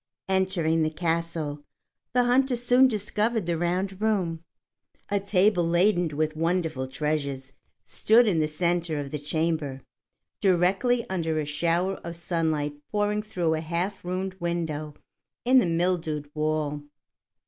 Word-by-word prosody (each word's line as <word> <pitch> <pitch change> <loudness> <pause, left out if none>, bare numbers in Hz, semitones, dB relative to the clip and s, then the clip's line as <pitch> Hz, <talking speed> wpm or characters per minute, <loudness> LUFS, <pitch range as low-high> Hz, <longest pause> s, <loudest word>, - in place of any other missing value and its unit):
Entering 185 -4 +1
the 155 - +2
castle, 160 -2 -2 0.5
the 250 0 +4
hunter 250 +1 +3
soon 245 +2 +5
discovered 215 -1 -1
the 170 0 0
round 185 +4 -1
room. 180 -7 0 0.7
A 200 -1 +1
table 195 -1 +3
laden 175 -2 +2
with 155 0 0
wonderful 165 -5 -1
treasures 140 -1 -3 0.3
stood 230 +2 +4
in 175 -6 +2
the 155 - +2
centre 170 0 0
of 140 -1 -5
the 150 - -3
chamber, 150 -2 -1 0.6
directly 195 +6 +2
under 165 -4 -1
a 155 - 0
shower 170 +5 0
of 170 0 -7
sunlight 160 -3 -1 0.2
pouring 210 0 +1
through 180 -7 -1
a 160 - -1
half 175 +5 -3
ruined 185 +1 -3
window 160 -3 -3 0.5
in 260 +1 +6
the 230 - +2
mildewed 165 -4 -1
wall. 150 -1 -1
170 Hz, 135 wpm, -26 LUFS, 155-195 Hz, 0.7 s, in